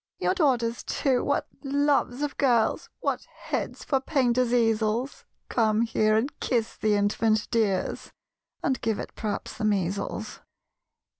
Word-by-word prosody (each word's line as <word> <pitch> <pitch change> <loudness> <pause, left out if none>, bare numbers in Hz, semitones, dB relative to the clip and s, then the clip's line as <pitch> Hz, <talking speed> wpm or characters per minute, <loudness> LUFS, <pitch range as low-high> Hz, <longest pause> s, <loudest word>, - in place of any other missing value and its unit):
"Your - - +1
daughters, 250 - +1
too, 265 -3 0
what - - 0 0.2
loves 285 -1 +1
of 290 - -2
girls 240 -5 +2
What - - -1
heads - - -5
for 270 - +1
painters' 255 -3 +1
easels! 225 +2 +1 0.2
Come 220 -2 +2
here 215 -2 +2
and 255 +7 -2
kiss 230 -3 -1
the 215 -1 +1
infant, 210 +1 +1
dears 210 -5 0 0.5
(And 265 -6 0
give 220 -2 0
it - - -6
p'rhaps 210 -2 -4
the - - -4
measles!) 200 -2 -1
230 Hz, 135 wpm, -27 LUFS, 215-265 Hz, 0.5 s, girls